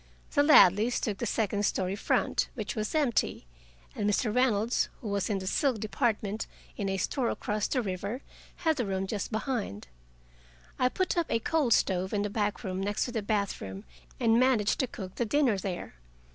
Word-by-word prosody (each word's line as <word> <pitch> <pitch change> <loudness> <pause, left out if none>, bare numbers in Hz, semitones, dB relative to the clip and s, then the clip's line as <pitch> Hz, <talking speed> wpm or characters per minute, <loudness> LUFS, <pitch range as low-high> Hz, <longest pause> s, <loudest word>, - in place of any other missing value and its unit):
The 285 - +4
Ladleys 235 - +6
took 205 -3 -2
the 235 - -1
second 205 -1 0
story 190 -2 0
front, 205 - 0
which 215 -5 -4
was 215 +5 -2
empty, 275 - +1 0.5
and 205 - 0
Mr. 210 +1 0
Reynolds, 235 -2 +2
who 220 - -5
was 200 +1 -1
in 205 - +1
the 190 - -5
silk 250 +4 +1
department 215 -1 -1 0.3
in 200 -1 -2
a 195 - -1
store 240 +6 0
across 210 0 -1
the 255 -3 0
river, 200 +6 -4 0.4
had 320 -2 +3
the 245 - 0
room 190 0 -1
just 205 +2 -3
behind. 220 - -3 0.9
I 250 - +4
put 370 +3 0
up 335 - 0
a - - +2
coal 290 +3 +1
stove 190 -4 +2
in 205 0 +1
a 205 - -3
back 210 0 -1
room 190 -2 -3
next 205 +1 0
the 225 - -1
bathroom, 200 - -2 0.4
and 230 0 +4
managed 250 -5 +3
to 260 - +1
cook 190 -5 -8
the 240 - +1
dinner 255 -5 +2
there. 185 -2 -5
215 Hz, 185 wpm, -29 LUFS, 200-245 Hz, 0.9 s, Ladleys